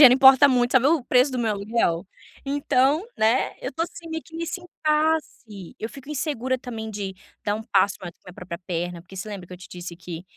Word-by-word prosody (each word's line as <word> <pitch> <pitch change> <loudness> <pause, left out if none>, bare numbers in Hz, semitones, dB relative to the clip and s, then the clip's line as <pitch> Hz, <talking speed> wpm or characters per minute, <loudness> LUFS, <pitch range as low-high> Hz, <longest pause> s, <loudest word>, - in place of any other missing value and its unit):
dinheiro 250 -1 +10
importa 265 +1 +8
muito. 245 -2 +2
Sabe 260 0 +5
o 320 -3 +3
preço 255 +3 +4
do 255 - -2
meu 225 -3 +1
aluguel? 200 -4 0 0.4
Então, 280 +1 +2
né, 225 +4 +2
eu 255 - -4
tô, 325 - -1
assim, 335 0 -7
meio 320 0 -3
que 325 - -12
nesse 335 +2 -3
impasse. 305 - -1
Eu 220 - -4
fico 275 +4 -11
insegura 260 -4 -1
também 225 -3 -6
de 200 -2 -4 0.3
dar 205 - +1
um 220 - -4
passo 200 -3 +2
maior 175 -2 -6
que - - -42
a - - -13
minha 180 - -16
própria 175 -2 -7
perna, 175 -1 -3
porque 185 +3 -14
você 190 +3 -5
lembra 195 -4 -7
que 180 - -13
eu - - -10
te 185 - -13
disse 175 -1 -7
que 170 -1 -7
240 Hz, 230 wpm, -24 LUFS, 190-280 Hz, 0.4 s, dinheiro